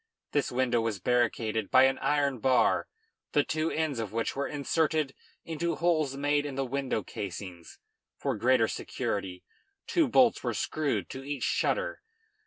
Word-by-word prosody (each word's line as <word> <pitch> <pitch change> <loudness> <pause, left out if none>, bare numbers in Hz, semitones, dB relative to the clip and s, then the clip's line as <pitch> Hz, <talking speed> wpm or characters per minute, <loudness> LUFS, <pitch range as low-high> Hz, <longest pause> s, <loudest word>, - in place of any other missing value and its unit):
This 145 -2 0
window 120 -2 +1
was 115 -3 -1
barricaded 115 -1 0
by 130 - +7
an 135 0 +3
iron 140 -3 +1
bar, 130 0 +3 0.5
the 145 - +4
two 155 +2 -1
ends 155 -6 -1
of 110 -3 -3
which 115 +1 -2
were 140 +1 -1
inserted 150 0 0 0.3
into 165 +1 -2
holes 155 -5 +1
made 145 +1 +1
in 145 -2 -5
the 135 0 -1
window 130 -4 -2
casings. 90 -3 -7 0.4
For 135 -3 -1
greater 120 +1 +3
security, 95 -4 -4 0.4
two 330 -4 +2
bolts 245 -2 +4
were 120 -3 -1
screwed 155 +5 -1
to 130 - -7
each 140 -2 -4
shutter. - - 0
135 Hz, 155 wpm, -29 LUFS, 115-150 Hz, 0.5 s, by